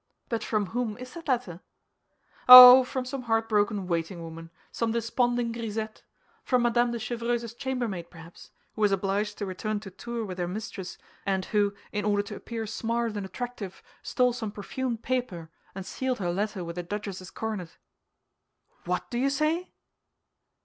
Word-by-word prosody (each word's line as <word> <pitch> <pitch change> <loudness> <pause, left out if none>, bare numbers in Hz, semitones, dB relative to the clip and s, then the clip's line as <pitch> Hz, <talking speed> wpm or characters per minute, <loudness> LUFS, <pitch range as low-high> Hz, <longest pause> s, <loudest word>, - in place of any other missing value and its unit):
"But 230 -3 -2
from 210 -2 0
whom 235 -3 -2
is 255 0 -10
that 335 -2 -10
letter?" 240 - -1 0.9
"Oh, 250 +1 +13
from 255 0 -4
some 265 +1 -5
heartbroken 220 -3 +1
waiting 170 0 -3
woman, 165 0 -9 0.2
some 230 -1 -1
desponding 235 +1 0
grisette; 220 -1 -5 0.4
from 250 -2 +2
Madame 240 0 +2
de 235 - -2
Chevreuse's 235 0 -3
chambermaid, 240 -10 -3
perhaps, 165 0 -14 0.2
who 215 - -7
was 205 -1 +4
obliged 200 +2 -1
to 205 - -3
return 205 +3 -3
to 195 -3 -9
Tours 235 +4 -5
with 185 -1 -7
her 175 - -1
mistress, 190 -1 -6 0.3
and 190 -1 -1
who, 205 -1 +1 0.2
in 205 -1 -2
order 205 0 +1
to 205 - -8
appear 230 -1 -5
smart 230 +1 -2
and 200 -2 -4
attractive, 235 -4 -7 0.2
stole 250 -1 +1
some 225 -4 -4
perfumed 235 +3 -4
paper, 190 -11 -3 0.2
and 190 -1 -6
sealed 260 +3 -2
her 175 -3 -2
letter 200 -1 -2
with 170 +1 -6
a - - -3
duchess's 190 -1 -6
coronet." 210 -7 -5 1.1
"What 180 +1 -2
do 240 - -1
you 270 +2 +2
say?" 305 +5 -1
220 Hz, 165 wpm, -27 LUFS, 195-240 Hz, 1.1 s, Oh